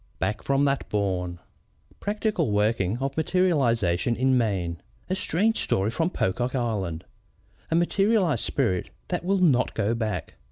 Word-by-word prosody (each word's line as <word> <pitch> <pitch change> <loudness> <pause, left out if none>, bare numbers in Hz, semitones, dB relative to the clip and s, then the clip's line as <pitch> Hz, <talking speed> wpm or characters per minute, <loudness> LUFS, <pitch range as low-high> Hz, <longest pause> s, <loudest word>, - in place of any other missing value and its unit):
Back 105 0 -2
from 140 +1 +2
That 140 -1 0
Bourne 90 -4 -1
ANONYMOUS - - -33 0.4
_Practical 165 - 0
Working 105 -1 +1
of 135 +1 -3
Materialization 125 - +2
in 130 +2 +2
Maine. 95 - 0 0.3
A - - +2
Strange 210 +5 +1
Story 100 +3 0
from 165 +7 0
Pocock 120 - -1
Island 105 -10 -2 0.6
A 160 - +1
Materialized 180 - +2
Spirit 110 -10 0 0.2
that 175 -1 -2
Will 195 +2 +2
not 145 -9 +3
Go 110 +1 +1
back. 110 - -3
120 Hz, 145 wpm, -26 LUFS, 100-160 Hz, 0.6 s, not